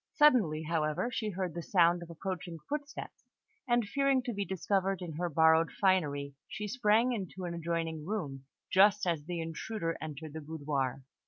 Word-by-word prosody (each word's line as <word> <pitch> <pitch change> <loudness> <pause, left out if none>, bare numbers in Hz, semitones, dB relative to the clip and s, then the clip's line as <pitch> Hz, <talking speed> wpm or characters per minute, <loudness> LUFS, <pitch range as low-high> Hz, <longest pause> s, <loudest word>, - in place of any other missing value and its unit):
Suddenly, 220 - +4
however, 155 +7 0
she 220 -3 -2
heard 185 -3 -3
the 170 - -4
sound 175 -1 +3
of 170 - -9
approaching 175 0 -5
footsteps, 295 0 -6 0.4
and 240 -2 +3
fearing 275 +2 +2
to 245 -1 -3
be 200 -1 -1
discovered 195 0 0
in 175 -3 -6
her 175 +1 -1
borrowed 160 +1 +5
finery, 145 -8 +2
she 210 +1 -5
sprang 230 +1 +3
into 190 -4 -5
an 170 - -3
adjoining 165 -2 -2
room, 145 -11 -3 0.3
just 200 +2 +5
as 165 -4 0
the 175 0 -3
intruder 165 +2 -3
entered 155 0 -6
the 160 - -5
boudoir. 140 -4 -2
175 Hz, 165 wpm, -32 LUFS, 160-210 Hz, 0.4 s, borrowed